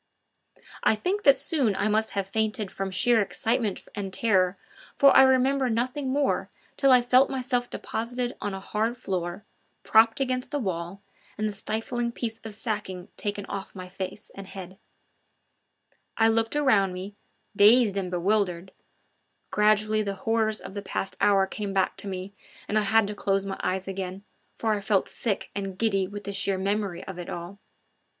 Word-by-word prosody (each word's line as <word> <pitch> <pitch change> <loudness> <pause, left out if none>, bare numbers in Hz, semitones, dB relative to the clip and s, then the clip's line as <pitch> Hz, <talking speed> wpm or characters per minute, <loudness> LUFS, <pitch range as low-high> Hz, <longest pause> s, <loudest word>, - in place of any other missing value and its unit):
I - - +4
think 370 - -1
that 275 -6 +6
soon 260 -11 0
I 215 - 0
must 220 +1 +1
have 195 - +1
fainted 215 0 -1
from 195 0 -3
sheer 225 +5 +3
excitement 210 +3 -1
and 200 -2 -4
terror, 190 -3 +2 0.4
for 275 -1 +6
I - - +10
remember 265 0 +4
nothing 255 +4 -1
more 280 +1 0 0.3
till 275 - +3
I 250 -1 +6
felt 255 +2 +5
myself 250 -2 -1
deposited 245 +2 -3
on 205 -1 -3
a - - -5
hard 220 +5 -2
floor, 185 0 -4 0.4
propped 225 +2 +5
against 255 -1 -1
the 290 - -2
wall, 190 -4 -4 0.3
and 215 +1 0
the 210 - -3
stifling 225 +4 -2
piece 225 -2 -4
of 220 -2 -8
sacking 205 -5 -4
taken 205 -1 -4
off 195 +1 -6
my 185 - -6
head 180 - -16 0.4
and 195 -1 -9
face. 185 -2 -8 1.5
I 225 0 +5
looked 225 +3 +1
around 215 -10 +3
me, 190 +3 -7 0.4
dazed 210 +1 +6
and 190 -2 -2
bewildered; 185 0 0 0.8
gradually 215 +1 +3
the 200 -2 -3
horrors 220 +2 0
of - - -9
the 200 - -4
past 195 -1 -4
hour 195 -1 +4
came 200 0 -5
back 190 -1 +1
to - - -4
me, 190 +1 -5 0.3
and 210 - -2
I 215 - +4
had 220 +1 +4
to 205 - -4
close 195 -1 0
my 195 -1 -5
eyes 190 +1 -2
again, 190 0 -5 0.3
for 220 -1 0
I 205 - -2
felt 200 -1 +1
sick 210 -5 -3
and 195 -2 -4
giddy 195 -4 +1
with 205 +1 -8
the 200 - -5
sheer 195 0 +1
memory 200 -1 -2
of 185 -2 -8
it 175 - -6
all. 175 +4 -7
210 Hz, 175 wpm, -26 LUFS, 195-230 Hz, 1.5 s, I